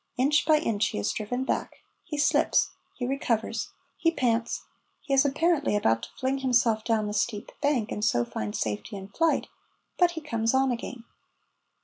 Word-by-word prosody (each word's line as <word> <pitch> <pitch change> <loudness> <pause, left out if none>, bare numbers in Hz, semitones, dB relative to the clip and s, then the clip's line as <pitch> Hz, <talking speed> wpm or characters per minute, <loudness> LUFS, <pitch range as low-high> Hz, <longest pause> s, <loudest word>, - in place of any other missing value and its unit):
Inch 290 +4 +3
by 310 -1 +6
inch 220 -9 +1
he - - -4
is 100 - 0
driven 245 +5 -2
back, - - -3 0.2
he 300 - -5
slips, 290 - +3 0.2
he 245 - -3
recovers, 245 -4 -1 0.3
he 330 - +3
pants, 240 -7 0 0.4
he 275 - -3
is 270 0 +6
apparently 295 -2 +2
about 115 - +2
to - - -7
fling 265 +1 0
himself 240 -4 +2
down 220 -2 +1
the 210 - -3
steep 210 0 -1
bank 280 -7 +1
and 210 - -3
so 120 - +2
find 105 -2 -4
safety 105 - -3
in 195 0 -8
flight, 330 +10 +1 0.5
but 350 -1 +4
he - - -2
comes 230 -5 0
on 265 0 +3
again. 240 0 -5
245 Hz, 175 wpm, -27 LUFS, 210-280 Hz, 0.5 s, by